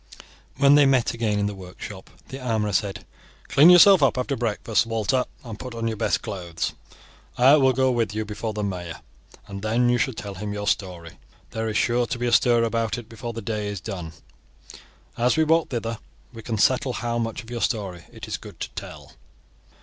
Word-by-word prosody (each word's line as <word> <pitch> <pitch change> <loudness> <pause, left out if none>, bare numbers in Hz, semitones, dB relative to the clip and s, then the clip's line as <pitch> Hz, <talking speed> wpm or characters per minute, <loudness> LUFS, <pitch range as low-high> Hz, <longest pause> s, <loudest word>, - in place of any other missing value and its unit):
When 140 0 +6
they 145 -1 +6
met 130 -3 +2
again 110 -3 -1
in 100 - 0
the 105 - -2
workshop 95 +1 -10 0.2
the 135 - -7
armourer 110 -5 -1
said: 100 +1 -1 0.4
"Clean 150 +5 +7
yourself 180 0 +8
up 135 -2 +3
after 130 +2 -1
breakfast, 115 -1 0
Walter, 115 +3 0 0.2
and 115 -4 -8
put 125 -2 -7
on 115 0 -2
your 110 - -2
best 110 - 0
clothes. 85 -4 -4 0.6
I 135 +4 +7
will 135 -2 +4
go 130 +1 +2
with 115 -4 0
you 110 0 -2
before 110 +1 -4
the 105 0 -4
mayor, 90 -5 -5 0.4
and 100 -2 -8
then 115 +3 +1
you 120 0 +2
shall 125 0 0
tell 100 -2 -6
him 105 +2 -5
your 105 0 -4
story. 90 -6 -3 0.3
There 110 0 -2
is 110 - -1
sure 120 0 +1
to - - -3
be 120 - -2
a 120 - 0
stir 120 -1 +4
about 115 0 -1
it 120 -1 -9
before 115 +1 -7
the 115 -1 -6
day 105 -1 -3
is 100 -2 -4
done. 85 -2 -6 1.1
As 125 +5 +2
we 160 - +4
walk 160 +1 +2
thither 115 -3 -3 0.3
we 115 - -9
can 110 0 -3
settle 130 +4 +2
how 120 -1 -2
much 115 +1 -3
of 115 - -13
your 120 -1 -4
story 95 -7 -2
it - - -9
is - - -3
good - - -13
to - - -3
tell." - - -9
115 Hz, 210 wpm, -24 LUFS, 105-125 Hz, 1.1 s, yourself